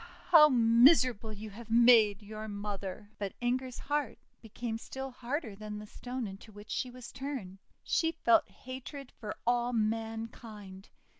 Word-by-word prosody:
How 305 -3 +9
miserable 235 -1 +5
you 215 0 -8
have 225 +2 -11
made 225 -3 +6
your 215 +1 -7
mother!' 205 -1 -6
But 200 -2 -4
Inger's 250 +1 -1
heart 295 0 -2 0.2
became 225 0 -5
still 265 +2 -6
harder 250 -2 -4
than 210 0 -7
the 210 - -8
Stone 245 +3 -5
into 195 +2 -9
which 205 +1 -12
she 255 - -1
was 250 -1 -10
turned. 255 -9 -6 0.2
She 325 -1 +1
felt 235 -8 +3
hatred 260 +1 -9
for 210 -2 -7
all 240 0 +1
mankind. 220 -3 -4
230 Hz, 145 wpm, -31 LUFS, 210-255 Hz, 0.2 s, How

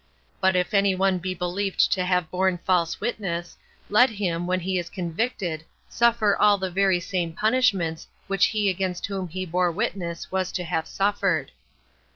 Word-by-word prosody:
But 190 -1 +3
if 180 +3 0
any 200 -1 +3
one 190 0 +1
be 185 +1 -3
believed 185 +3 0
to 185 - +1
have 180 -3 0
borne 185 0 +1
false 170 -1 0
witness, 175 -7 -3 0.3
let 245 +5 +5
him, 175 -5 -2
when 185 0 0
he 185 +1 -1
is 175 0 -5
convicted, 175 -2 -3 0.3
suffer 235 -3 +3
all 210 -1 +4
the 190 -1 -3
very 190 -1 +2
same 175 -2 -2
punishments 200 -8 +1 0.2
which 195 -1 +3
he 210 -2 0
against 185 -1 -1
whom 195 -2 -4
he 185 +3 -5
bore 180 +1 +1
witness 170 0 -3
was 190 -1 -1
to 180 - -2
have 160 -1 -2
suffered. 195 -7 0
185 Hz, 170 wpm, -25 LUFS, 175-200 Hz, 0.3 s, let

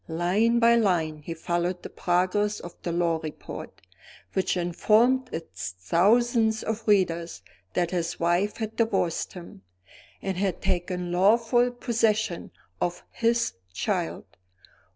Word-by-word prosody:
Line 185 +8 +2
by 235 0 +5
line 170 -8 +1
he 165 +2 -5
followed 175 +2 -2
the - - -6
progress 185 +4 +1
of 175 - -9
the 175 - -3
law 170 -1 +1
report, 155 -1 -8 0.5
which 185 -1 0
informed 225 +9 +3
its 95 - -6
thousands 220 - +3
of 225 0 -4
readers 170 -5 +1 0.3
that 175 -1 0
his 170 -2 -2
wife 175 +5 +1
had 220 -1 -4
divorced 225 -7 0
him, 170 - -11 0.6
and 190 -2 -3
had 190 -2 -1
taken 180 -1 -2
lawful 230 +6 +4
possession 220 -5 0 0.3
of 175 0 -2
his 230 0 +1 0.2
child. 180 - -2
185 Hz, 125 wpm, -26 LUFS, 170-225 Hz, 0.6 s, by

